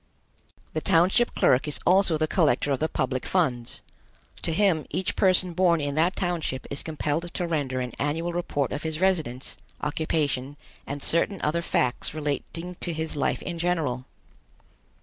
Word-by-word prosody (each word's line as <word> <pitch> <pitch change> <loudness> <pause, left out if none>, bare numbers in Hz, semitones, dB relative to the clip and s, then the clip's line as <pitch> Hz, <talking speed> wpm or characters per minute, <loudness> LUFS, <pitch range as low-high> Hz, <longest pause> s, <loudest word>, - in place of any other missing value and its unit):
The 155 - -1
township 185 +11 +3
clerk 130 +4 +3
is 150 - +2
also 185 -2 +4
the 155 - +2
collector 145 -5 +2
of 135 - +1
the 155 - 0
public 130 -1 -1
funds. 125 -10 -1 0.6
To - - -1
him 170 -3 +2
each 190 +5 -1
person 185 -2 +3
born 170 -1 +3
in 145 -1 -2
that 165 +6 +2
township 170 -8 -2
is 140 - -2
compelled 160 +2 -2
to 180 - 0
render 140 -6 -1
an 125 -2 -4
annual 165 +4 -1
report 145 -6 -1
of 145 - -3
his 160 -1 -3
residence, 160 -10 0 0.2
occupation, 145 -2 -1 0.3
and 145 0 -4
certain 170 +3 +2
other 165 +3 +1
facts 125 -3 0
relating 160 +4 -4
to 175 - -1
his 160 0 -3
life 145 - 0
in 170 -2 -4
general. 155 -8 0
160 Hz, 160 wpm, -26 LUFS, 145-175 Hz, 0.6 s, also